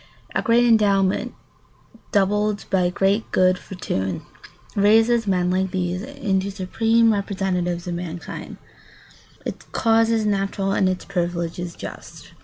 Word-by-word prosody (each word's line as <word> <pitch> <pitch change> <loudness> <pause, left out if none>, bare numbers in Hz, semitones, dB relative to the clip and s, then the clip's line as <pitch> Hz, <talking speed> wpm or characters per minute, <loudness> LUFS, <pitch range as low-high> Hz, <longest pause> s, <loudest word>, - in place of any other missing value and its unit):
A - - +1
great 235 +1 +4
endowment, 200 -4 +2 0.8
doubled 205 +1 +1
by 180 -2 +3
great 195 +4 0
good 185 0 +3
fortune, 95 - -4 0.5
raises 225 +3 +4
men 180 -2 +1
like 190 +1 +1
these 180 0 -2
into 200 -7 -2
supreme 225 +4 +2
representatives 185 -3 -2
of 175 - -3
mankind. 170 -1 -6 0.8
[Sidenote: - - -26
Its - - -6
causes 225 -1 +3
natural 195 -1 0
and 190 -1 +2
its 185 -1 -3
privileges 175 -2 -3
just. - - -10
195 Hz, 120 wpm, -22 LUFS, 180-210 Hz, 0.8 s, great